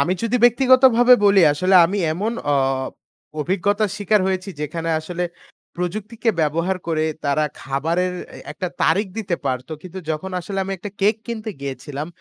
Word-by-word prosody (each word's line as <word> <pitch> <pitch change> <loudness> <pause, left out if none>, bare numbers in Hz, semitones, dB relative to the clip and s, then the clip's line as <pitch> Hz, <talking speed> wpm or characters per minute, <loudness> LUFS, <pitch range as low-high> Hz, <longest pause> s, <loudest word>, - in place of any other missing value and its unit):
আমি 165 +6 +2
যদি 230 +2 +1
ব্যক্তিগতভাবে 250 0 +6
বলি, 200 -1 +6
আসলে 185 +6 +1
আমি 200 +4 -2
এমন 205 +8 -2 0.2
অ - - +3 0.9
অভিজ্ঞতার 200 +5 0
শিকার 210 0 +2
হয়েছি 190 +1 -2
যেখানে 165 +3 -3
আসলে 175 +2 -4 0.5
প্রযুক্তিকে 215 +6 -2
ব্যবহার 165 +5 0
করে 160 -2 0 0.2
তারা 145 +2 +1 0.2
খাবারের 165 +7 -1 0.2
এ - - -10
একটা 185 -3 -4
তারিখ 205 +2 +2
দিতে 190 -5 -2
পারত 130 +1 -2
কিন্তু 185 +1 -8
যখন 155 +5 -3
আসলে 195 +3 -5
আমি 195 - -4
একটা 205 - -7
কেক 210 +3 +3
কিনতে 225 -2 -4
গিয়েছিলাম, 140 +1 -5
185 Hz, 150 wpm, -21 LUFS, 160-210 Hz, 0.9 s, ব্যক্তিগতভাবে